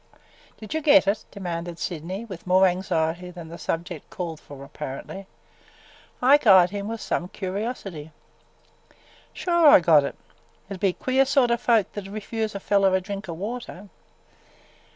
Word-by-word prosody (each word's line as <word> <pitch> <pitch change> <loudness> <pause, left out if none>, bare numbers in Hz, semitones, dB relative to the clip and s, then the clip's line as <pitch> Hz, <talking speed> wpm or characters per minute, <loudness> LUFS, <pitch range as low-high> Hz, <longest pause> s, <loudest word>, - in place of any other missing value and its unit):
"Did 215 +5 -8
you 315 - -1
get 295 -3 +6
it?" 205 +2 -1
demanded 175 -3 -5
Sydney, 180 +7 -5
with 185 -5 -10
more 185 +1 +5
anxiety 180 -1 -1
than 175 -2 -10
the 170 - -9
subject 165 -1 -4
called 165 -4 -5
for, 140 -3 -12
apparently. 150 +7 -8 1.0
Ike 275 0 +5
eyed 185 -3 +7
him 200 0 -4
with 225 +1 -4
some 175 - -2
curiosity. 190 -5 -5 1.2
"Sure 345 -3 +2
I 285 - +9
got 160 -4 +5
it. 140 - -4 0.6
It - - -2
'd 190 - -8
be 190 -1 +1
queer 260 +6 +2
sort 265 -3 +3
o' 235 - +3
folks 230 -5 +2
that 205 -2 -6
'd 195 - -10
refuse 215 0 -4
a - - -3
feller 195 -1 +2
a - - +2
drink 195 +1 -7
o' - - -3
water! 205 +1 -7
190 Hz, 165 wpm, -24 LUFS, 175-220 Hz, 1.2 s, I